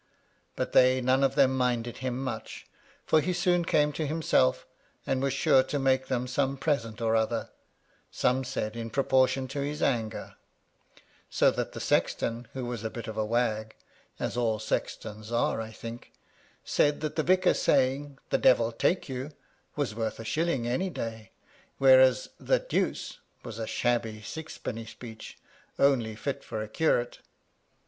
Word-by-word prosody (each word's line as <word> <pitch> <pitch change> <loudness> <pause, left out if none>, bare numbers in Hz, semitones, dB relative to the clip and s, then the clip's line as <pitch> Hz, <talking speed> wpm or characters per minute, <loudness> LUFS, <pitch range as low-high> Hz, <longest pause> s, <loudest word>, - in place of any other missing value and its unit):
But - - -2
they 130 0 +5
none 130 +2 +2
of 135 - +2
them 130 -2 +4
minded 120 -2 0
him 130 0 -3
much, 130 - -6 0.4
for 155 - +4
he 180 +4 -1
soon 175 0 +2
came 150 -2 +2
to 155 +1 -2
himself, 65 - +2 0.4
and 130 -1 0
was 135 0 +1
sure 135 0 +4
to 140 +2 -3
make 130 -1 +2
them 125 -2 -1
some 135 +2 0
present 120 -6 -1
or 115 0 +2
other 110 0 0 0.3
— - - -40 0.2
some 130 +1 +1
said 115 -4 -3
in 115 -1 -5
pro 135 +5 0
portion 130 0 +2
to 140 - -3
his 150 +2 -3
anger; 115 -5 -1 0.9
so - - +4
that - - -3
the - - -6
sexton, 115 0 0
who 130 -2 -4
was 120 -3 -4
a 110 - -2
bit 115 0 -7
of 110 - -5
a 110 - 0
wag 110 -1 -1 0.4
(as - - -2
all 115 -3 +1
sextons 110 0 -4
are, 115 -1 +1
I 110 - -6
think), 115 +2 -9 0.5
said 145 0 +2
that 155 -1 -3
the 155 - +2
vicar's 185 +3 +3
saying, 135 +1 +1
"the - - +2
Devil 115 -2 +4
take 175 +10 0
you," 130 +1 -4 0.5
was 145 -7 -1
worth 110 0 -3
a 115 - -7
shilling 140 -1 0
any 175 +11 0
day, 115 - -6 0.5
whereas 130 -1 +6
"the - - +2
Deuce" - - -2 0.2
was 115 -2 -7
a 110 - -3
shabby 115 -3 -1
sixpenny 115 -4 -6
speech, 110 -1 -10 0.4
only 120 -6 +2
fit 140 +5 -4
for 110 - -4
a - - -7
curate. 120 -1 0
125 Hz, 170 wpm, -28 LUFS, 115-140 Hz, 0.9 s, whereas